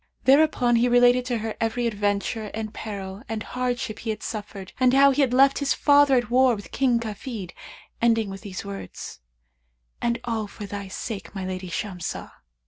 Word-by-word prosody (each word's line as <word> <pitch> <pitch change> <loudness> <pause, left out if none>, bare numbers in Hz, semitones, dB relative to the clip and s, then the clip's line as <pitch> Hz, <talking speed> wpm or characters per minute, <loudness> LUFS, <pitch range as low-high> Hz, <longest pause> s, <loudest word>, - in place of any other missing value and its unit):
Thereupon 265 -4 +4
he 245 +2 +3
related 245 +1 +5
to 245 -2 -1
her 220 0 -4
every 225 +2 0
adventure 205 0 -1
and 220 0 -4
peril 200 -2 -6
and 220 -1 -3
hardship 245 -4 -3
he 225 - -5
had 215 -1 -3
suffered 205 -3 -6
and 255 0 +4
how 275 0 +7
he 280 +2 +1
had 265 -3 +2
left 275 +2 +5
his 280 -1 +1
father 285 -2 +5
at 240 -1 0
war 255 -1 +5
with 205 - -10
King 250 -3 +2
Kafid, 215 -3 -6 0.5
ending 225 -3 +2
with 195 - -8
these 200 -2 -7
words, 200 - -8 0.8
'And 235 0 0
all 225 -3 -2
for 205 +1 -9
thy 200 0 -6
sake, 200 +1 -6
my 190 -1 -4
lady 185 0 -5
Shamsah!' 180 -1 -4
225 Hz, 180 wpm, -25 LUFS, 205-250 Hz, 0.8 s, how